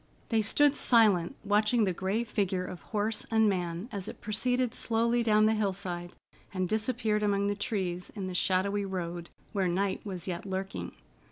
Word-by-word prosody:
They 225 Hz, -2 st, +3 dB
stood 290 Hz, +7 st, +3 dB
silent, 210 Hz, -8 st, +4 dB
watching 210 Hz, +3 st, +3 dB
the 190 Hz, -3 st, +1 dB
gray 195 Hz, +6 st, -1 dB
figure 195 Hz, -4 st, -1 dB
of 180 Hz, -1 st, -8 dB
horse 215 Hz, 0 st, -2 dB
and 220 Hz, -1 st, +4 dB
man 180 Hz, 0 st, -1 dB
as 200 Hz, -3 st, -4 dB
it -, -, -8 dB
proceeded 245 Hz, +3 st, 0 dB
slowly 235 Hz, +1 st, +1 dB
down 215 Hz, -2 st, +4 dB
the 220 Hz, -, +4 dB
hillside 185 Hz, -4 st, -2 dB, 0.4 s
and 185 Hz, -1 st, -1 dB
disappeared 220 Hz, 0 st, 0 dB
among 200 Hz, -1 st, +1 dB
the 205 Hz, 0 st, 0 dB
trees 185 Hz, -4 st, -2 dB
in 200 Hz, -3 st, -4 dB
the 185 Hz, -, -4 dB
shadowy 195 Hz, +3 st, +2 dB
road, 175 Hz, -3 st, -4 dB, 0.2 s
where 195 Hz, -3 st, +1 dB
night 190 Hz, +2 st, -1 dB
was 185 Hz, -3 st, -5 dB
yet 175 Hz, -1 st, -3 dB
lurking. 190 Hz, 0 st, -4 dB
200 Hz, 170 wpm, -30 LUFS, 185-220 Hz, 0.4 s, silent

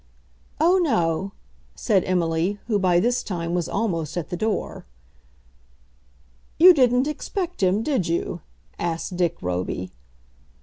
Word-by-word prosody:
"Oh, 355 Hz, +4 st, +4 dB
no," 190 Hz, -, 0 dB, 0.4 s
said 200 Hz, -6 st, +1 dB
Emily, 175 Hz, +2 st, 0 dB
who 215 Hz, -3 st, 0 dB
by 180 Hz, -2 st, +3 dB
this 240 Hz, +6 st, +1 dB
time 170 Hz, -4 st, -4 dB
was 175 Hz, -2 st, -1 dB
almost 170 Hz, -7 st, -2 dB
at 170 Hz, -, -4 dB
the 180 Hz, -, -3 dB
door. 215 Hz, +2 st, -3 dB, 1.7 s
"You 360 Hz, +2 st, +9 dB
didn't 250 Hz, -3 st, +3 dB
expect 350 Hz, -, -4 dB
him, 190 Hz, +3 st, +2 dB
did 260 Hz, -, 0 dB
you?" 165 Hz, +1 st, -2 dB, 0.4 s
asked 170 Hz, +1 st, -3 dB
Dick 175 Hz, -2 st, 0 dB
Roby. 90 Hz, 0 st, -3 dB
185 Hz, 125 wpm, -23 LUFS, 170-245 Hz, 1.7 s, You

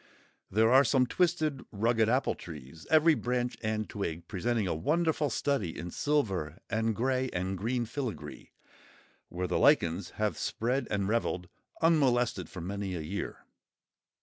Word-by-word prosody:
There 110 Hz, +3 st, +3 dB
are 135 Hz, +2 st, +8 dB
some 130 Hz, -2 st, +3 dB
twisted, 155 Hz, -2 st, 0 dB
rugged 110 Hz, +1 st, +2 dB
apple 130 Hz, +3 st, +2 dB
trees, 75 Hz, -1 st, -11 dB
every 160 Hz, +1 st, +6 dB
branch 125 Hz, -1 st, -1 dB
and 110 Hz, -1 st, -1 dB
twig 85 Hz, -4 st, -4 dB
presenting 110 Hz, +2 st, -1 dB
a 90 Hz, -, 0 dB
wonderful 155 Hz, -, +1 dB
study 120 Hz, -, -1 dB
in 85 Hz, +1 st, -5 dB
silver 95 Hz, -, 0 dB
and 110 Hz, +1 st, +1 dB
grey 130 Hz, +2 st, 0 dB
and 95 Hz, +2 st, -2 dB
green 120 Hz, +5 st, -1 dB
filigree, 120 Hz, -, -6 dB, 0.8 s
where 90 Hz, +1 st, -3 dB
the -, -, 0 dB
lichens 85 Hz, +3 st, +3 dB
have 105 Hz, -1 st, 0 dB
spread 125 Hz, +5 st, -1 dB
and 100 Hz, -2 st, 0 dB
revelled 95 Hz, -5 st, -1 dB, 0.3 s
unmolested 125 Hz, -, +3 dB
for 90 Hz, -, -7 dB
many 95 Hz, +1 st, -3 dB
a 85 Hz, -, -3 dB
year. 95 Hz, +7 st, -5 dB
110 Hz, 145 wpm, -30 LUFS, 95-130 Hz, 0.8 s, are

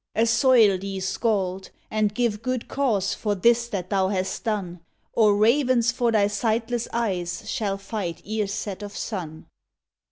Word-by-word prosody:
"Assoil 230 Hz, -3 st, +4 dB
thee, 195 Hz, 0 st, -5 dB
skald! 190 Hz, -1 st, -1 dB, 0.2 s
and 215 Hz, -1 st, 0 dB
give 230 Hz, -3 st, 0 dB
good 255 Hz, -1 st, -2 dB
cause 225 Hz, -9 st, 0 dB
For 210 Hz, -2 st, -1 dB
this 235 Hz, +4 st, +3 dB
that 190 Hz, -4 st, -5 dB
thou 190 Hz, -1 st, +2 dB
hast 190 Hz, -1 st, -2 dB
done, 195 Hz, -6 st, -2 dB, 0.3 s
Or 210 Hz, -2 st, +4 dB
ravens 240 Hz, +1 st, +3 dB
for 240 Hz, 0 st, 0 dB
thy 210 Hz, -3 st, +3 dB
sightless 225 Hz, +3 st, -1 dB
eyes 185 Hz, -7 st, -2 dB
Shall 205 Hz, -5 st, -1 dB
fight 195 Hz, -4 st, -5 dB
ere 215 Hz, -1 st, -1 dB
set 200 Hz, 0 st, -4 dB
of 205 Hz, 0 st, -7 dB
sun!" 165 Hz, -7 st, -5 dB
210 Hz, 150 wpm, -24 LUFS, 195-230 Hz, 0.3 s, Assoil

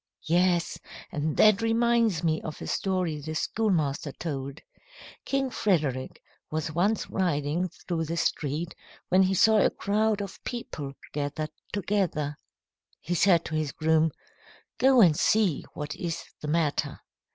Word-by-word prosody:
"Yes, 175 Hz, +1 st, +2 dB, 0.3 s
and 150 Hz, -1 st, -2 dB
that 215 Hz, -1 st, +6 dB
reminds 225 Hz, -5 st, +2 dB
me 160 Hz, -1 st, +1 dB
of 155 Hz, -, -7 dB
a -, -, -6 dB
story 180 Hz, -6 st, -1 dB
the 155 Hz, +2 st, -5 dB
schoolmaster 160 Hz, -8 st, 0 dB
told. 140 Hz, -3 st, -5 dB, 0.7 s
King 270 Hz, -1 st, 0 dB
Frederick 150 Hz, -, -1 dB, 0.3 s
was 155 Hz, 0 st, -2 dB
once 195 Hz, +7 st, +1 dB
riding 170 Hz, -1 st, 0 dB
through 165 Hz, -1 st, -4 dB
the 165 Hz, +2 st, -3 dB
street 155 Hz, +2 st, -1 dB, 0.4 s
when 185 Hz, +1 st, +5 dB
he 190 Hz, 0 st, +3 dB
saw 220 Hz, +3 st, +5 dB
a -, -, +4 dB
crowd 215 Hz, +1 st, 0 dB
of 200 Hz, -1 st, -7 dB
people 150 Hz, -, -5 dB, 0.2 s
gathered 150 Hz, +1 st, -3 dB, 0.2 s
together. 185 Hz, -7 st, -1 dB, 0.6 s
He 175 Hz, -, -3 dB
said 175 Hz, -1 st, +4 dB
to -, -, -6 dB
his 155 Hz, -2 st, -1 dB
groom, 160 Hz, 0 st, +3 dB, 0.7 s
'Go 260 Hz, -1 st, +6 dB
and 170 Hz, -7 st, +6 dB
see 205 Hz, -3 st, +2 dB
what 150 Hz, 0 st, -5 dB
is 170 Hz, -2 st, -4 dB, 0.2 s
the 150 Hz, -, -5 dB
matter.' 155 Hz, -1 st, 0 dB
170 Hz, 140 wpm, -27 LUFS, 150-200 Hz, 0.7 s, that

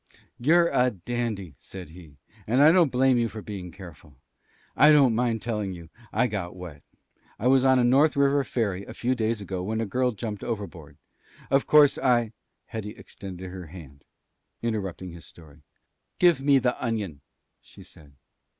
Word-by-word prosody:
"You're 170 Hz, +6 st, +4 dB
a 125 Hz, 0 st, +2 dB
dandy," 105 Hz, -, -4 dB
said 95 Hz, -4 st, -10 dB
he. 80 Hz, -4 st, -15 dB, 0.3 s
"And 125 Hz, +6 st, +4 dB
I 155 Hz, -, +8 dB
don't 170 Hz, -5 st, +4 dB
blame 130 Hz, 0 st, +3 dB
you 115 Hz, -1 st, 0 dB
for 110 Hz, -1 st, -9 dB
being 95 Hz, -4 st, -7 dB
careful. 85 Hz, -6 st, -13 dB, 0.6 s
I 150 Hz, +2 st, +7 dB
don't 140 Hz, -5 st, +5 dB
mind 115 Hz, -1 st, 0 dB
telling 105 Hz, -5 st, -3 dB
you. 85 Hz, -2 st, -12 dB, 0.2 s
I 120 Hz, +4 st, +2 dB
got 100 Hz, -7 st, -4 dB
wet. 85 Hz, -6 st, -10 dB, 0.6 s
I 110 Hz, -, -6 dB
was 130 Hz, 0 st, +4 dB
on 130 Hz, 0 st, +5 dB
a 125 Hz, -, +3 dB
North 135 Hz, +6 st, +4 dB
River 140 Hz, 0 st, +3 dB
ferry 100 Hz, -7 st, -2 dB
a -, -, -10 dB
few 125 Hz, +2 st, 0 dB
days 115 Hz, -3 st, -1 dB
ago 95 Hz, -2 st, -4 dB
when 110 Hz, +4 st, -3 dB
a 115 Hz, -, -1 dB
girl 125 Hz, +5 st, 0 dB
jumped 105 Hz, -1 st, -6 dB
overboard. 100 Hz, -9 st, -6 dB, 0.5 s
Of 135 Hz, 0 st, +2 dB
course, 150 Hz, -2 st, +5 dB
I 120 Hz, -3 st, +2 dB, 0.2 s
" -, -, -52 dB
Hetty 110 Hz, -3 st, -6 dB
extended 95 Hz, -2 st, -9 dB
her 90 Hz, -2 st, -8 dB
hand, 75 Hz, -5 st, -13 dB, 0.6 s
interrupting 95 Hz, -5 st, -3 dB
his 85 Hz, 0 st, -12 dB
story. 80 Hz, -2 st, -16 dB, 0.6 s
"Give 170 Hz, -6 st, +4 dB
me 140 Hz, 0 st, +4 dB
the 125 Hz, -1 st, -1 dB
onion," 105 Hz, -, -3 dB, 0.4 s
she -, -, -16 dB
said. 75 Hz, -3 st, -17 dB
110 Hz, 175 wpm, -26 LUFS, 90-125 Hz, 0.6 s, I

